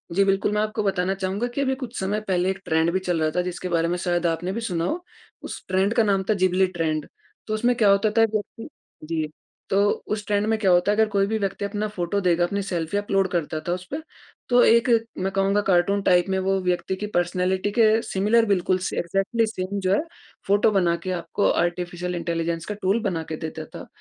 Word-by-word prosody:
जी 195 - +5
बिल्कुल 195 +1 +1
मैं 210 0 +1
आपको 215 0 -2
बताना 190 -1 0
चाहूँगा 195 +5 -2
कि 280 - 0
अभी 265 -1 +1
कुछ 255 -3 -6
समय 200 +3 -1
पहले 185 -1 +1
एक 190 0 -2
ट्रेंड 160 +1 +2
भी 190 - 0
चल 175 -3 -1
रहा 155 0 +1
था 180 - +2
जिसके 180 0 -4
बारे 170 -1 +1
में 175 +1 -1
शायद 175 -1 -1
आपने 170 +2 -2
भी 230 +4 -3
सुना 175 -6 -2
हो, 350 - -2 0.4
उस - - -7
ट्रेंड 190 +3 +1
का 230 - +4
नाम 195 -2 +1
था - - +5
जिब्ली 185 -1 +2
ट्रेंड। 160 -4 -2 0.4
तो 215 - -2
उसमें 240 +3 +2
क्या 220 -4 +4
होता 200 +2 +4
था - - +7
व्यक्ति 215 +1 -4 0.4
जी, 160 -1 -1 0.4
तो 200 +1 +3 0.2
उस 210 -1 -3
ट्रेंड 205 0 +1
में 220 - +2
क्या 195 -3 +3
होता 180 +3 +4
है - - +2
अगर 220 - +4
कोई 200 -1 +2
भी 220 +1 0
व्यक्ति 200 0 -2
अपना 210 +1 -2
फ़ोटो 195 -1 -2
देगा 175 -2 +2
अपनी 200 +3 -1
सेल्फ़ी 175 -1 -2
अपलोड 195 -2 +1
करता 160 -2 -1
था 175 - +1
उस 180 0 -5
पे। 295 - -2 0.5
तो 245 0 +5
एक 230 +1 +4 0.3
मैं 190 +1 -1
कहूँगा 195 +1 +2
कार्टून 195 +2 +3
टाइप 175 -1 +4
में 190 - +1
वो 190 0 +1
व्यक्ति 180 +1 -1
की 210 +2 -5
पर्सनैलिटी 185 +3 0
के 220 0 +4
सिमिलर 215 +4 +2
बिल्कुल 185 -3 +1
से - - -4
एग्ज़ैक्टली 195 +6 0
सेम 200 -1 -4
जो 190 0 +1
है - - +3 0.5
फ़ोटो 205 +2 +4
बना 180 -4 +2
के 185 - -3
आपको 180 +3 0
आर्टिफिशियल 175 +1 -2
इंटेलिजेंस 165 -1 -2
का 210 - -4
टूल 195 +5 +2
बना 170 -5 -1
के - - -1
देता 155 - -6
था। - - -8
190 Hz, 225 wpm, -24 LUFS, 175-205 Hz, 0.5 s, था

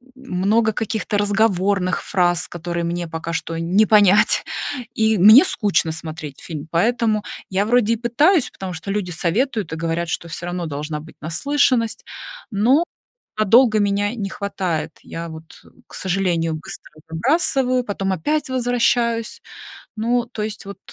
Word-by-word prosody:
много 220 -2 0
каких-то 215 0 -2
разговорных 200 -2 +1
фраз, 175 -2 +1
которые 170 0 -4
мне 170 0 -3
пока 165 +1 -5
что 165 0 -3
не 180 +6 +3
понять, 205 -1 +5 0.5
и 220 -1 +2
мне 215 - +9
скучно 200 - +1
смотреть 155 -3 -7
фильм, 155 -2 -7
поэтому 215 +4 +1 0.3
я 195 +1 0
вроде 230 0 +3
и - - +1
пытаюсь, 260 - +2
потому 185 -2 -7
что 170 +4 -5
люди 195 -3 -2
советуют 200 - -1
и - - -2
говорят, 165 +1 -2
что 170 - -3
всё 170 +1 -6
равно 175 -1 -3
должна 150 0 -4
быть 160 +2 -13
наслышанность, 235 - 0 0.5
но 240 +10 +3 0.6
надолго 215 +1 +5
меня 205 +1 0
не 205 -5 -4
хватает. 185 -5 -3
Я 170 0 -7
вот, 160 0 -12 0.3
к - - -15
сожалению, 175 -4 -1
быстро 155 - -10 0.2
забрасываю, 255 - +1
потом 195 -2 -2
опять 295 - -1
возвращаюсь. 240 -2 0 0.6
Ну, 235 +2 0
то 230 -3 -6
есть 210 -1 -5
вот 200 - -8
200 Hz, 145 wpm, -20 LUFS, 170-230 Hz, 0.6 s, мне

